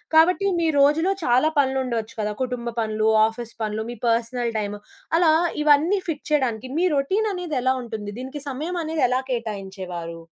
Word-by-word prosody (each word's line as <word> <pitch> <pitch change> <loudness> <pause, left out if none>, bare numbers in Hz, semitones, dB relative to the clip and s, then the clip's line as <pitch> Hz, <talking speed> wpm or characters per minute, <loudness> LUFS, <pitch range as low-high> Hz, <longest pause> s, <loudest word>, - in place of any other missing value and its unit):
కాబట్టి 360 +5 +5
మీ 335 - +2
రోజులో 305 +6 +4
చాలా 255 +3 +3
పనులు 265 -1 +2
ఉండొచ్చు 230 -3 -3
కదా. 210 0 -1
కుటుంబ 245 -2 -3
పనులు, 215 -1 +1 0.2
ఆఫీస్ 230 +1 -7
పనులు, 215 0 -2
మీ 240 - -8
పర్సనల్ 235 +1 0
టైము, 205 0 -4 0.4
అలా 335 -2 +5 0.3
ఇవన్నీ 305 +7 +4
ఫిట్ 310 -4 -4
చేయడానికి 255 -4 0
మీ 365 - +3
రొటీననేది 360 +1 0
ఎలా 260 +1 +3
ఉంటుంది? 215 -3 -6
దీనికి 265 +3 -6
సమయమనేది 320 +2 -2
ఎలా 255 +1 +1
కేటాయించేవారు? 190 -7 -5
255 Hz, 150 wpm, -23 LUFS, 220-310 Hz, 0.4 s, కాబట్టి